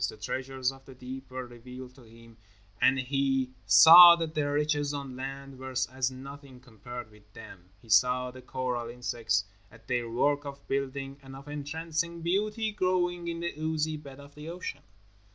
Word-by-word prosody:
The -, -, -10 dB
treasures 130 Hz, 0 st, -2 dB
of 135 Hz, 0 st, -15 dB
the 130 Hz, -, -13 dB
deep 130 Hz, +1 st, -9 dB
were 130 Hz, 0 st, -6 dB
revealed 125 Hz, +1 st, -11 dB
to 130 Hz, -, -17 dB
him, 115 Hz, 0 st, -17 dB, 0.4 s
and 135 Hz, -, +5 dB
he 135 Hz, 0 st, 0 dB, 0.2 s
saw 170 Hz, -, +11 dB
that 165 Hz, -2 st, -4 dB
the 150 Hz, -2 st, 0 dB
riches 145 Hz, 0 st, 0 dB
on 140 Hz, -2 st, -6 dB
land 135 Hz, 0 st, -7 dB
were 130 Hz, 0 st, -7 dB, 0.2 s
as 130 Hz, -1 st, 0 dB
nothing 135 Hz, 0 st, -11 dB
compared 120 Hz, -1 st, -10 dB
with 105 Hz, 0 st, -21 dB
them. 95 Hz, -6 st, -13 dB
He 115 Hz, -, -18 dB
saw 125 Hz, +3 st, +3 dB
the 130 Hz, 0 st, -12 dB
coral 125 Hz, -2 st, -3 dB
insects 115 Hz, -4 st, -1 dB, 0.3 s
at 115 Hz, -1 st, -18 dB
their 120 Hz, -2 st, -1 dB
work 145 Hz, +5 st, +1 dB
of 140 Hz, -1 st, -9 dB
building, 135 Hz, 0 st, -3 dB
and 135 Hz, 0 st, -11 dB
of 135 Hz, +2 st, -12 dB
entrancing 160 Hz, +3 st, -4 dB
beauty 210 Hz, +5 st, 0 dB
growing 180 Hz, -3 st, 0 dB
in 170 Hz, 0 st, -4 dB
the 170 Hz, -, -3 dB
oozy 155 Hz, 0 st, -1 dB
bed 140 Hz, -2 st, -11 dB
of 140 Hz, 0 st, -14 dB
the 150 Hz, +2 st, -9 dB
ocean. 175 Hz, +2 st, -6 dB
135 Hz, 175 wpm, -29 LUFS, 125-150 Hz, 0.4 s, saw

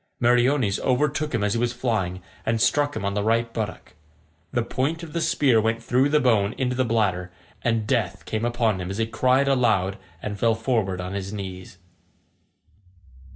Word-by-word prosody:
Meriones 120 Hz, -2 st, +3 dB
overtook 150 Hz, +3 st, 0 dB
him 110 Hz, -, 0 dB
as 105 Hz, -1 st, +1 dB
he 115 Hz, -, 0 dB
was 120 Hz, 0 st, 0 dB
flying, 95 Hz, -7 st, -2 dB, 0.2 s
and 115 Hz, 0 st, 0 dB
struck 145 Hz, +5 st, +2 dB
him 100 Hz, -, -3 dB
on 100 Hz, -, -1 dB
the 105 Hz, -, 0 dB
right 115 Hz, +1 st, +1 dB
buttock. 105 Hz, -4 st, -5 dB, 0.6 s
The 120 Hz, -2 st, 0 dB
point 145 Hz, +8 st, -2 dB
of 160 Hz, -, -9 dB
the 170 Hz, -, -1 dB
spear 135 Hz, -7 st, +3 dB
went 115 Hz, +1 st, -1 dB
through 130 Hz, +4 st, +2 dB
the 150 Hz, +1 st, +4 dB
bone 110 Hz, -6 st, +2 dB
into 125 Hz, -1 st, 0 dB
the 130 Hz, -, +2 dB
bladder, 100 Hz, -6 st, 0 dB, 0.3 s
and 115 Hz, -2 st, 0 dB
death 115 Hz, -7 st, -1 dB
came 110 Hz, 0 st, -3 dB
upon 115 Hz, -5 st, +1 dB
him 90 Hz, -, -4 dB
as 100 Hz, -, -4 dB
he 115 Hz, -, +1 dB
cried 130 Hz, +4 st, +2 dB
aloud 110 Hz, -7 st, +2 dB, 0.2 s
and 105 Hz, +2 st, -5 dB
fell 115 Hz, -1 st, +3 dB
forward 110 Hz, -5 st, -1 dB
on 90 Hz, +1 st, -5 dB
his 95 Hz, -1 st, -4 dB
knees. 95 Hz, -2 st, -7 dB
115 Hz, 185 wpm, -24 LUFS, 100-130 Hz, 0.6 s, the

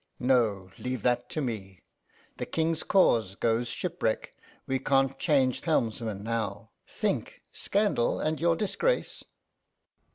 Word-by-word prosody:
'No, 110 Hz, -7 st, +2 dB
leave 125 Hz, -3 st, -3 dB
that 120 Hz, 0 st, +1 dB
to 155 Hz, -, -2 dB
me. 95 Hz, -7 st, -5 dB, 0.5 s
The -, -, -4 dB
King's 160 Hz, 0 st, 0 dB
cause 115 Hz, -, +3 dB
goes 115 Hz, +2 st, +1 dB
shipwreck; 175 Hz, -7 st, -2 dB, 0.3 s
we 130 Hz, 0 st, 0 dB
can't 135 Hz, 0 st, +2 dB
change 135 Hz, -5 st, +2 dB
helmsman 115 Hz, -, -1 dB
now. 115 Hz, -2 st, -3 dB, 0.2 s
Think -, -, -2 dB
scandal 200 Hz, -, +1 dB
and 155 Hz, 0 st, -1 dB
your 170 Hz, 0 st, +3 dB
disgrace! 465 Hz, -, -1 dB
125 Hz, 120 wpm, -28 LUFS, 115-160 Hz, 0.5 s, cause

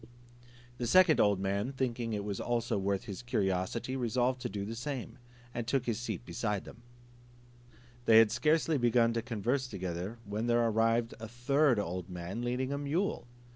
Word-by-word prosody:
The 120 Hz, -, -1 dB
second 180 Hz, +3 st, +6 dB
old 100 Hz, -2 st, +4 dB
man 100 Hz, +6 st, -1 dB
thinking 120 Hz, -3 st, -2 dB
it 105 Hz, -1 st, -2 dB, 0.2 s
also 115 Hz, -3 st, 0 dB
worth 100 Hz, 0 st, -1 dB
his 100 Hz, +1 st, -7 dB
curiosity, 115 Hz, +1 st, -1 dB
resolved 125 Hz, +1 st, 0 dB
to -, -, -3 dB
do 100 Hz, -1 st, -4 dB
the 110 Hz, -, -5 dB
same, 125 Hz, +2 st, -5 dB, 0.3 s
and 120 Hz, -1 st, -4 dB
took 130 Hz, 0 st, +1 dB
his 115 Hz, -1 st, -1 dB
seat 120 Hz, -, -4 dB, 0.2 s
by 105 Hz, -3 st, +1 dB
them. -, -, -13 dB, 1.2 s
They 110 Hz, -2 st, +7 dB
had 110 Hz, -2 st, +7 dB
scarcely 155 Hz, +3 st, +2 dB
begun 120 Hz, -1 st, +3 dB
to 115 Hz, -, 0 dB
converse 125 Hz, +3 st, -1 dB
together, 95 Hz, +1 st, -4 dB
when 105 Hz, +3 st, -3 dB
there 120 Hz, 0 st, +3 dB
arrived 115 Hz, +1 st, +2 dB
a 115 Hz, -, -6 dB
third 130 Hz, +3 st, +2 dB
old 90 Hz, -2 st, -3 dB
man 90 Hz, +5 st, -5 dB
leading 125 Hz, +3 st, -1 dB
a 140 Hz, -, -2 dB
mule. 150 Hz, +1 st, -1 dB
115 Hz, 170 wpm, -32 LUFS, 105-125 Hz, 1.2 s, They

